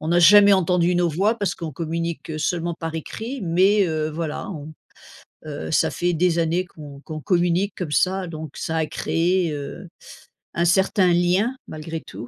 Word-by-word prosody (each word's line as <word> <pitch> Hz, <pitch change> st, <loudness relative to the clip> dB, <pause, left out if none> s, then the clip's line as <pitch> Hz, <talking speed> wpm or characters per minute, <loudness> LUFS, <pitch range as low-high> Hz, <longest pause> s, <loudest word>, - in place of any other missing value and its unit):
on 155 Hz, -, -4 dB
n'a 175 Hz, +1 st, +3 dB
jamais 200 Hz, +3 st, +8 dB
entendu 180 Hz, -1 st, +2 dB
nos 175 Hz, -1 st, +2 dB
voix 200 Hz, +8 st, +1 dB
parce 200 Hz, -4 st, -1 dB
qu'on 165 Hz, -2 st, -6 dB
communique 165 Hz, 0 st, -4 dB
seulement 170 Hz, +1 st, -1 dB
par 165 Hz, -1 st, -6 dB
écrit, 230 Hz, -, -6 dB
mais 190 Hz, +4 st, +3 dB
heu, 155 Hz, -1 st, -1 dB
voilà 155 Hz, +2 st, -4 dB
on 155 Hz, -3 st, -8 dB, 0.7 s
heu, 150 Hz, +1 st, -6 dB
ça 150 Hz, -, +2 dB
fait 175 Hz, 0 st, 0 dB
des 170 Hz, 0 st, +2 dB
années 170 Hz, +3 st, 0 dB
qu'on 145 Hz, -4 st, -12 dB
qu'on 155 Hz, +1 st, -7 dB
communique 180 Hz, +2 st, +1 dB
comme 170 Hz, -5 st, -4 dB
ça 185 Hz, +3 st, +1 dB
donc 155 Hz, -3 st, -8 dB
ça 160 Hz, -, -3 dB
a 160 Hz, -, +1 dB
créé, 175 Hz, 0 st, 0 dB
heu, 145 Hz, -1 st, -7 dB, 0.7 s
un 170 Hz, -, +1 dB
certain 190 Hz, 0 st, +3 dB
lien 180 Hz, +8 st, +2 dB
malgré 160 Hz, +1 st, -6 dB
tout. 120 Hz, -, -9 dB
170 Hz, 175 wpm, -22 LUFS, 160-185 Hz, 0.7 s, jamais